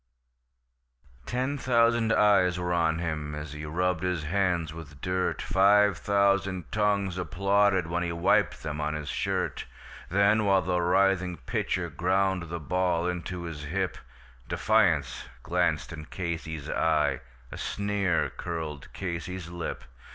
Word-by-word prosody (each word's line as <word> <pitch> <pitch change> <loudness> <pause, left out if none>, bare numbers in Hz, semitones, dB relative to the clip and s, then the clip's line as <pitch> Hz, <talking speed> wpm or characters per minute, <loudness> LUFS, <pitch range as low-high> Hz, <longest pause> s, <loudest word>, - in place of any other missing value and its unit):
Ten 130 +3 -1
thousand 115 -2 +3
eyes 100 -5 +4
were 90 0 -1
on 80 -2 +2
him 75 -3 -3
as 75 0 -6
he 75 +1 -6
rubbed 90 +2 0
his 90 -4 -1
hands 85 -2 0
with 75 -4 -10
dirt, 90 +2 -1
Five 100 +1 +4
thousand 100 -3 +1
tongues 100 -3 +1
applauded 100 +1 +2
when 85 +2 -2
he 85 -1 -1
wiped 85 0 +2
them 75 -1 -3
on 75 +1 -1
his 75 -1 -5
shirt; - - -2 0.4
Then, 100 +3 +3
while 95 -2 +3
the 90 0 0
writhing 90 0 +2
pitcher 90 +6 -1
ground 95 +1 0
the 85 0 -4
ball 90 +2 0
into 90 0 -4
his 80 -3 -6
hip, 95 +4 -2 0.5
Defiance 90 -12 +2 0.2
glanced 85 -3 0
in 75 -1 -8
Casey's 80 -3 -5
eye, 80 -2 +1 0.3
a - - -7
sneer 100 -3 0
curled 80 -5 -6
Casey's 90 -1 -5
lip. 85 -4 -5
90 Hz, 135 wpm, -28 LUFS, 80-100 Hz, 0.5 s, eyes